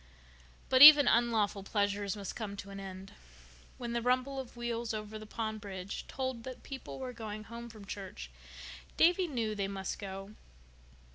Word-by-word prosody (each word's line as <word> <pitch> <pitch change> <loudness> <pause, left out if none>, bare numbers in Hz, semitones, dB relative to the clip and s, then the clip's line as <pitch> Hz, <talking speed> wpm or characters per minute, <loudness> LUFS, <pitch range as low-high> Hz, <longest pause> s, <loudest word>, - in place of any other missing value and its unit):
But 260 0 +4
even 290 -2 +12
unlawful 220 -4 +2
pleasures 200 0 -1
must 200 -2 -6
come 205 -3 -5
to 200 0 -8
an 195 - -7
end. 190 0 -9 0.6
When 240 -1 -5
the 235 - 0
rumble 255 +3 +1
of 250 -2 -8
wheels 235 -1 -3
over 215 0 -6
the 215 - -10
pond 220 -1 -4
bridge 195 -2 -6
told 260 -3 -4
that 255 0 -8
people 270 -2 -8
were 255 -1 -5
going 215 -2 -6
home 235 +2 -9
from 215 -3 -12
church 190 - -7 0.7
Davy 355 +2 +4
knew 230 -7 -2
they 200 -2 -2
must 195 -1 -4
go. 195 0 -7
220 Hz, 165 wpm, -32 LUFS, 200-240 Hz, 0.7 s, even